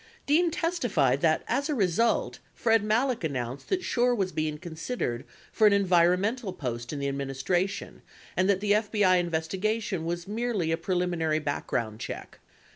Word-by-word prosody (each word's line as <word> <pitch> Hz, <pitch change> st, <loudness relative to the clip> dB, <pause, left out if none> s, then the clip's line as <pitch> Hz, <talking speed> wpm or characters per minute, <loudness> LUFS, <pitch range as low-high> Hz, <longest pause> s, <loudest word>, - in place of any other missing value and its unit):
Dean 330 Hz, +4 st, +3 dB
testified 240 Hz, -, +1 dB
that 160 Hz, -1 st, +2 dB
as 280 Hz, +3 st, 0 dB
a 300 Hz, -, +1 dB
result, 210 Hz, +2 st, +1 dB, 0.2 s
Fred 225 Hz, -3 st, +3 dB
Malek 230 Hz, +1 st, +1 dB
announced 130 Hz, -4 st, -4 dB
that 370 Hz, -1 st, 0 dB
Schorr 245 Hz, 0 st, +2 dB
was 190 Hz, -4 st, -1 dB
being 155 Hz, -2 st, -2 dB
considered 160 Hz, -, -4 dB, 0.3 s
for 215 Hz, -, +4 dB
an 205 Hz, -, +5 dB
environmental 190 Hz, +3 st, +2 dB
post 120 Hz, -7 st, -4 dB
in 150 Hz, -, -4 dB
the 140 Hz, 0 st, -2 dB
administration, 140 Hz, +7 st, -2 dB, 0.3 s
and 185 Hz, +1 st, +2 dB
that 195 Hz, -1 st, +2 dB
the 205 Hz, 0 st, 0 dB
FBI 205 Hz, -3 st, +3 dB
investigation 185 Hz, +4 st, -1 dB
was 170 Hz, +1 st, -3 dB
merely 210 Hz, -6 st, -1 dB
a -, -, +3 dB
preliminary 175 Hz, -3 st, 0 dB
background 120 Hz, -7 st, -2 dB
check. -, -, -7 dB
185 Hz, 150 wpm, -28 LUFS, 155-220 Hz, 0.3 s, an